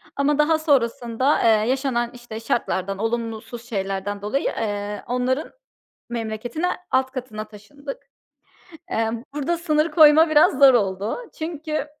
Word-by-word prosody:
ama 280 +1 +1
daha 315 +1 +3
sonrasında, 255 -2 +1
eee, 220 0 +4
yaşanan, 255 -3 0
işte, 240 -2 -8
şartlardan, 195 -4 -1
olumlusuz 230 +1 -4
şeylerden 195 -1 -3
dolayı, 210 +7 -1
eee, 205 -1 -3
onların 250 +4 -1 0.6
memleketine, 235 +7 -3 0.2
alt 260 0 +2
katına 245 -5 -6
taşındık. 275 +7 -10 0.8
Emm, 225 -2 -1
burada 295 +4 -1
sınır 315 -1 +1
koyma 310 +1 +7
biraz 295 -3 +5
zor 275 -2 +8
oldu. 200 -2 0 0.2
Çünkü, 315 -2 -3
240 Hz, 120 wpm, -23 LUFS, 220-290 Hz, 0.8 s, zor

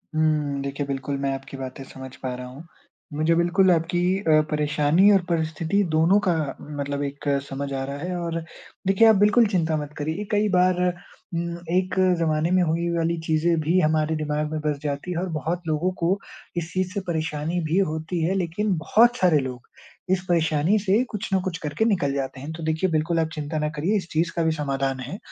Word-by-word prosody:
हुँ। 150 -3 +1
देखिए 140 +1 -3
बिल्कुल 140 0 -3
मैं 135 0 0
आपकी 135 0 -9
बातें 130 0 -7
समझ 130 0 -10
पा 130 -1 -4
रहा 125 0 -7
हूँ। 135 +6 -11 0.5
मुझे 155 +3 +2
बिल्कुल 180 +2 +3
आपकी 170 +1 +1 0.2
अ, 155 -6 +4
परेशानी 150 +5 +3
और 195 -2 +5
परिस्थिति 165 +4 0
दोनों 165 +6 +4
का 180 - +4 0.5
मतलब 140 0 -2
एक 140 +1 -5 0.2
समझ 140 +1 -4
आ 135 - -2
रहा 140 +1 -5
है 180 +4 -4
और 165 -1 -2 0.5
देखिए, 195 +4 +5
आप 220 - +7
बिल्कुल 210 +4 +5
चिंता 165 -6 0
मत 150 0 -6
करिए। 160 +7 -2
कई 210 0 +2
बार 180 0 +3 0.5
म 170 0 -2
एक 185 +2 +1 0.2
ज़माने 160 +1 +1
में 185 - +4
हुई 170 +1 0
वाली 165 0 0
चीज़ें 160 +1 +2
भी 170 +4 +2
हमारे 155 -1 +2
दिमाग 150 0 -2
में 155 - -2
बस 150 -1 0
जाती 145 +4 -3
है 175 - -2
और 185 0 -2
बहुत 160 +3 -2
लोगों 160 +4 +1
को 180 +4 +2 0.4
इस 170 0 -3
चीज़ 185 0 -1
से 200 - -1
परेशानी 160 +1 -2
भी 165 +4 +1
होती 160 -1 -1
है, 180 - +1
लेकिन 190 +3 0
बहुत 235 +9 +4
सारे 175 -7 +4
लोग 125 -3 -6 0.4
इस 185 -1 +2
परेशानी 160 +2 +2
से 205 +4 +2
कुछ 210 0 -5
न 190 - +4
कुछ 175 -3 -2
करके 150 +9 0
निकल 180 -11 +1
जाते 135 -1 -3
हैं। 150 +3 -6
तो 160 0 -7
देखिए, 160 +4 0
बिल्कुल 165 +1 +1
आप 160 -1 0
चिंता 155 0 -4
ना 150 - 0
करिए 170 +9 0
इस 185 -4 -4
चीज़ 165 +2 +1
का 170 - +1
भी 160 - +2
समाधान 135 -3 -1
है 135 +9 -6
160 Hz, 205 wpm, -24 LUFS, 150-180 Hz, 0.5 s, आप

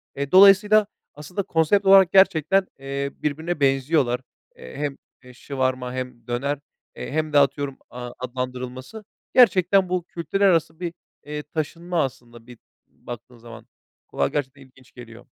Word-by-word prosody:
Eee, 140 0 -4
dolayısıyla 200 +2 +6 0.3
aslında 150 +7 -5
konsept 175 +5 +1
olarak 195 -2 +7
gerçekten, 190 0 +4
eee, 140 +1 -4
birbirine 160 +3 -3
benziyorlar. 135 -2 +1 0.3
Eee, 65 - -12
hem, 145 -2 -3 0.3
eee, 125 0 -14
shawarma 130 -1 -3
hem 125 -2 -7
döner, 135 +4 -2 0.4
eee, - - -7
hem 155 +1 -2
de 145 - +6
atıyorum, 140 -1 0
aaa, 125 0 -8
adlandırılması. 125 - -6 0.3
Gerçekten 190 -5 +4
bu 180 -1 -1
kültürler 175 +4 -2
arası 165 -3 +1
bir, 175 -2 -4 0.3
eee, 150 0 -5
taşınma 165 +3 -3
aslında 120 -2 -8
bir 125 -1 -13 0.3
baktığın 120 +1 -11
zaman. 115 -1 -13 0.4
Kulağa 70 - -1
gerçekten 135 - -4
ilginç 130 -1 -20
geliyor. 120 -1 -13
140 Hz, 140 wpm, -23 LUFS, 125-175 Hz, 0.4 s, olarak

